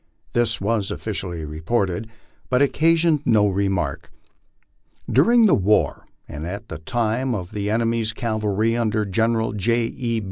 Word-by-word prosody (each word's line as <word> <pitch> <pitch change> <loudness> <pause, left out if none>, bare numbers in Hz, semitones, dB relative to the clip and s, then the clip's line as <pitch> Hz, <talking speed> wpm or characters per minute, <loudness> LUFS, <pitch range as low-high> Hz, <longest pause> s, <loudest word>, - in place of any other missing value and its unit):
This 115 -2 +1
was 105 0 0
officially 95 -6 -4
reported, 90 +6 -2 0.4
but 125 - +2
occasioned 160 +2 +3
no 105 -5 +4
re 100 0 0
mark. 90 -8 -3 1.0
During 230 - +5
the 205 - +5
war, 105 +2 +1 0.2
and 75 +2 -6
at 100 +3 -7
the 80 - -6
time 120 +6 -1 0.2
the 105 -1 -3
enemy's 115 0 0
cavalry 110 -1 -1
under 110 -2 0
General 110 +3 0
J. 115 +3 +1
E. 115 -3 -1
110 Hz, 135 wpm, -22 LUFS, 100-120 Hz, 1.0 s, During